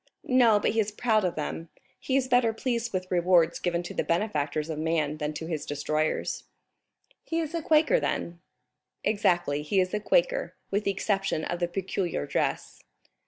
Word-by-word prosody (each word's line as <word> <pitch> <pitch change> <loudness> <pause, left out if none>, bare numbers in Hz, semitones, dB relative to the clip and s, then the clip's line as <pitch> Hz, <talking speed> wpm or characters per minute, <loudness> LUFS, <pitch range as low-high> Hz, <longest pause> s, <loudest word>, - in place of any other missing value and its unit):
"No, 240 -5 +5
but - - +1
he 225 - 0
is 215 -1 +1
proud 215 -1 +1
of 180 -2 0
them; 155 +2 -4 0.3
he 260 - -2
is 260 -1 0
better 245 -3 +3
pleased 235 0 -2
with 185 -1 -3
rewards 175 -2 +3
given 175 -1 -1
to 175 - -7
the - - -1
benefactors 155 -5 -1
of 155 -2 -4
man 155 -2 0
than 150 -1 -2
to 155 +2 -6
his 160 -3 -3
destroyers." 155 +2 -2 0.8
"He 330 - -2
is 320 -1 -3
a 335 - -1
Quaker 315 +11 +4
then?" 170 0 -3 0.6
"Exactly, 175 -8 +1
he 155 +6 +1
is 185 0 +1
a 210 - +1
Quaker, - - +1 0.2
with 205 +2 0
the 200 - +2
exception 195 -4 -1
of 175 - -3
the 175 - +1
peculiar 180 - -2
dress." - - -2
185 Hz, 180 wpm, -27 LUFS, 160-225 Hz, 0.8 s, No